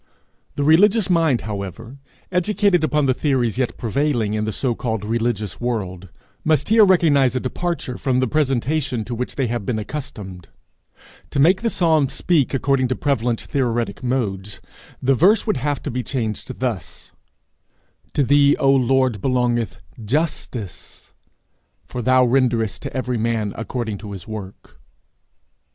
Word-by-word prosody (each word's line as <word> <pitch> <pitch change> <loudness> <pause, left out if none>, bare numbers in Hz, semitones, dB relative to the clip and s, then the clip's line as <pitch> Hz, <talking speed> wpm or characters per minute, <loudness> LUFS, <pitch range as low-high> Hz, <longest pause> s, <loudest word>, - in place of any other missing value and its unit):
The 145 - -1
religious 195 +6 +4
mind, 165 -8 +3
however, 105 +5 -6 0.3
educated 185 -1 +2
upon 150 -1 +2
the 130 - +3
theories 125 -4 0
yet 130 - -1
prevailing 120 -3 0
in 105 0 -1
the 110 - -2
so 125 +3 -1
called 110 -3 -3
religious 115 -2 -2
world, 95 -7 -3 0.3
must 155 -1 +1
here 220 0 +6
recognize 145 - +4
a - - +1
departure 130 -1 -3
from 130 -2 +1
the 130 - +2
presentation 135 -3 0
to 120 - -5
which 125 +2 -4
they 135 - 0
have 120 -2 -2
been 110 +2 -2
accustomed: 105 - -7 0.8
to - - -2
make 180 +8 +4
the 230 - +1
psalm 160 - +2
speak 160 -7 +1
according 135 -1 +1
to 130 - -1
prevalent 120 -5 0
theoretic 120 -6 -2
modes, 105 -6 -2 0.4
the 135 +2 +4
verse 195 - +4
would 215 - 0
have 145 +1 -2
to 145 - -3
be 125 +1 -2
changed 120 -1 -4
thus: 125 -6 -4 1.0
'To 145 - +3
thee, 145 +1 +5
O 135 - +3
Lord, 130 -4 +2
belongeth 125 -3 0 0.3
justice, 125 - -4 0.7
for 125 - -5
thou 130 +1 +4
renderest 120 -5 +1
to - - -6
every 125 -2 -1
man 110 -2 -1
according 115 -3 -4
to 105 -1 -8
his 95 +1 -9
work.' 105 -3 -9
125 Hz, 150 wpm, -21 LUFS, 115-145 Hz, 1.0 s, here